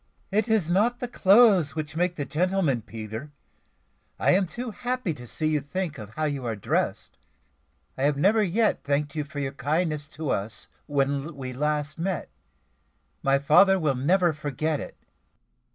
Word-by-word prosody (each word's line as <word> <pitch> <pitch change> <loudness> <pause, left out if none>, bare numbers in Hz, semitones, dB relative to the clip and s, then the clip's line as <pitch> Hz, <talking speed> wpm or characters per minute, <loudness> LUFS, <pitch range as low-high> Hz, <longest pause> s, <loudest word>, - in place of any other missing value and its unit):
"It 215 +3 +1
is 220 -7 +2
not 215 +8 +2
the 245 - -3
clothes 200 -8 +5
which 155 -1 -4
make 175 +1 0
the 145 - -3
gentleman, 170 -5 +1
Peter. 110 +4 -7 0.9
I - - +3
am 190 0 +3
too 240 +6 -5
happy 250 -5 -2
to 125 -4 -11
see 155 +6 -1
you 155 -1 +1
to - - -20
think 175 -3 -3
of 105 0 -10
how 155 - -2
you 140 -3 -2
are 115 -2 -2
dressed. 100 - -2 0.8
I 135 - 0
have 145 -1 +2
never 205 +9 +4
yet 210 +3 +1
thanked 145 0 -1
you 150 - -2
for 145 0 -11
your 140 -2 -2
kindness 150 +1 -1
to 155 -3 -2
us 100 +1 -3 0.2
when 140 +1 -1
we 130 -2 -6
last 150 +2 -2
met. 185 0 -2 0.9
My 135 0 +3
father 180 +8 +5
will 155 -6 +1
never 170 +6 +2
forget 150 +1 -2
it." - - -8
155 Hz, 170 wpm, -26 LUFS, 140-185 Hz, 0.9 s, clothes